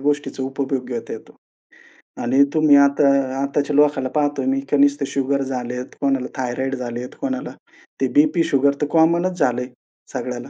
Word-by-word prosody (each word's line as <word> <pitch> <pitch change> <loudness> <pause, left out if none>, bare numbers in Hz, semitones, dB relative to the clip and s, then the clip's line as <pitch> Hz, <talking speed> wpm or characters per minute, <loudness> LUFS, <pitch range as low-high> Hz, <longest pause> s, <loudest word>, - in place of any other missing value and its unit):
गोष्टीचा 145 -1 -1
उपभोग 135 -1 -3
घेता 120 -2 -5
येतो 110 - -10 0.9
आणि 130 +4 +4
तुम्ही 155 -2 +5
आता 140 0 +4 0.3
आताच्या 140 +1 -1
लोकांला 145 -3 +3
पाहतो 145 -1 0
मी 270 0 +1
की - - +2
नुसतं 285 0 +3
शुगर 140 0 -1
झालेत, 125 -1 -4 0.2
कोणाला 135 -2 0
थायरॉईड 130 +1 -2
झालेत, 125 0 -5
कोणाला 265 -1 -3 0.5
ते - - +3
बीपी, 295 - +4
शुगर 140 -2 +2
तर - - +2
कॉमन 170 +2 +3
च - - -12
झालं 125 0 +1
आहे 125 0 -8 0.4
सगळ्याला. - - -5
140 Hz, 160 wpm, -20 LUFS, 130-150 Hz, 0.9 s, तुम्ही